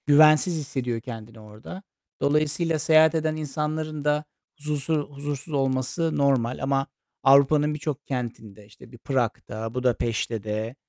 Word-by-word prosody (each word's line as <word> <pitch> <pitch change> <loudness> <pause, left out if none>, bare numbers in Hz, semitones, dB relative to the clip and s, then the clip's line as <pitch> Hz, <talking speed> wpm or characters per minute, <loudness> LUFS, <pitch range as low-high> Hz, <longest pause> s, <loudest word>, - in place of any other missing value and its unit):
Güvensiz 155 +4 +6
hissediyor 130 -6 -3
kendini 115 -1 -9
orada. 110 - -11 0.4
Dolayısıyla 155 +2 +1
seyahat 160 +1 +5
eden 155 -1 0
insanların 155 0 -3
da 150 0 +2 0.3
zusu 150 +1 -2 0.2
huzursuz 145 +2 -5
olması 135 +4 0
normal 130 -4 +1
ama 135 0 +1 0.4
Avrupa'nın 140 +2 +5
birçok 150 -2 -4
kentinde, 110 -5 -5
işte 105 +3 -17
bir 120 - -12
Prag'da, 115 -3 -3
Budapeşte'de, 115 -2 -1
140 Hz, 115 wpm, -25 LUFS, 120-150 Hz, 0.4 s, Güvensiz